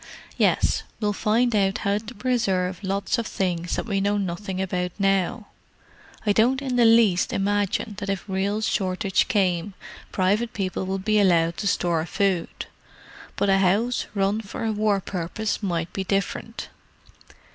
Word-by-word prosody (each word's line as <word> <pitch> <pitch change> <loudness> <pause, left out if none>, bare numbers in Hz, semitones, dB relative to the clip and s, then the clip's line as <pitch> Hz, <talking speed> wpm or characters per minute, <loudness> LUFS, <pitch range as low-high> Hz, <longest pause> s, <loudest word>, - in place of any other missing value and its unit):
"Yes. - - +2 0.2
We'll 210 -1 0
find 225 +3 +1
out 195 0 +2
how 200 +1 +2
to 225 +3 -10
preserve 200 -6 0
lots 200 +5 -1
of 230 - -3
things 175 -2 -2
that - - -3
we 200 -3 -1
know 205 +1 +1
nothing 190 0 -3
about 180 -2 -2
now. 195 +3 0 0.8
I 210 - +3
don't 245 +5 +3
in 265 -3 -3
the 240 -1 +5
least 225 -6 +4
imagine 205 +2 0
that 200 - -4
if 195 0 -3
real 200 +2 -1
shortage 190 -1 0
came 190 -4 0 0.4
private 205 +5 +1
people 190 -2 -3
would 190 0 -3
be 215 -1 +3
allowed 170 -4 +3
to 205 - -2
store 170 -3 +1
food; 190 -3 -1 0.7
but - - 0
a 195 0 +4
house 205 +6 +1
run 200 +2 +1
for 220 +2 -6
a 220 - +1
war 210 -2 +1
purpose 190 +5 -3
might 170 -4 -2
be 195 - -2
different. 195 +1 -3
200 Hz, 155 wpm, -24 LUFS, 185-215 Hz, 0.8 s, the